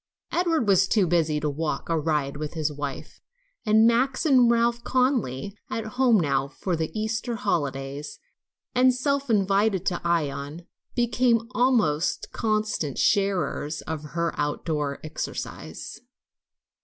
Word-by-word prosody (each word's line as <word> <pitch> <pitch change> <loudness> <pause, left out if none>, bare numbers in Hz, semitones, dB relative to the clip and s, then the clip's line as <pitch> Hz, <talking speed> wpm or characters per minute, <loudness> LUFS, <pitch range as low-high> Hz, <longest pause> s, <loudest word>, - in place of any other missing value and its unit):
Edward 330 -9 +1
was 190 -1 +4
too 205 -2 +3
busy 160 -3 +1
to 150 - -1
walk 150 -1 -2
or 165 -2 0
ride 150 -3 0
with 150 +2 -5
his 155 -1 -1
wife, 145 -1 -6 0.5
and 220 +1 +6
Max 255 +6 +2
and 255 -5 +5
Ralph 235 0 +2
Conly, 235 - 0
at 225 - -3
home 245 -1 +3
now 140 -4 +1
for 175 +5 -3
the 160 -1 -2
Easter 220 +2 -2
holidays 140 -5 -3 0.6
and 255 0 +4
self 280 +1 -1
invited 200 -2 +2
to 175 - -1
Ion, 155 -1 -2 0.3
became 240 -1 +3
the 230 +2 -11
almost 220 - +1
constant 215 - -1
sharers 190 -6 +1
of 160 -2 -5
her 170 0 0
outdoor 145 -1 -1
exercise. 155 0 -6
190 Hz, 130 wpm, -25 LUFS, 150-235 Hz, 0.6 s, and